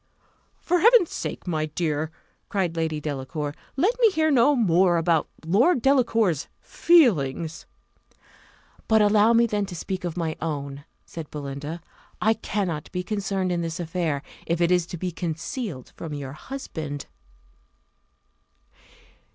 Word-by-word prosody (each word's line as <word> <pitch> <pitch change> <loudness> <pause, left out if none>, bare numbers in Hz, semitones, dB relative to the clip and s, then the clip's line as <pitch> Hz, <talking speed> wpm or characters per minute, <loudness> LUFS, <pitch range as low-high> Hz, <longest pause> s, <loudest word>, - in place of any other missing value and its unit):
"For 355 +1 +1
Heaven's 455 -3 +5
sake, - - -5
my 155 -3 -1
dear," 155 -1 -1 0.4
cried 185 -5 -1
Lady 160 -2 -1
Delacour, 145 0 -4 0.2
"let 365 - +3
me 460 -2 +6
hear 315 -5 +1
no 275 +2 +5
more 180 -6 +3
about 165 -1 +1 0.2
Lord 245 - +4
Delacour's 230 - +2
feelings." 165 - +2 1.2
"But 220 -1 +5
allow 210 +2 +5
me 235 0 +5
then 210 -3 -1
to 180 - -7
speak 185 +2 -4
of 175 -1 -4
my 160 -2 -1
own," 140 -3 -4 0.2
said 165 -3 -8
Belinda: 145 +3 -6 0.4
"I 220 - +3
cannot 185 -9 -3
be 180 0 -3
concerned 195 -2 -1
in 175 -1 0
this 165 0 -4
affair, 165 -4 -2 0.2
if 170 0 0
it 170 0 +3
is 180 -2 +2
to 175 - -6
be 180 +2 -3
concealed 170 - -5
from 155 -3 -6
your 140 -2 -6
husband." 155 - -6
175 Hz, 135 wpm, -25 LUFS, 155-215 Hz, 1.2 s, me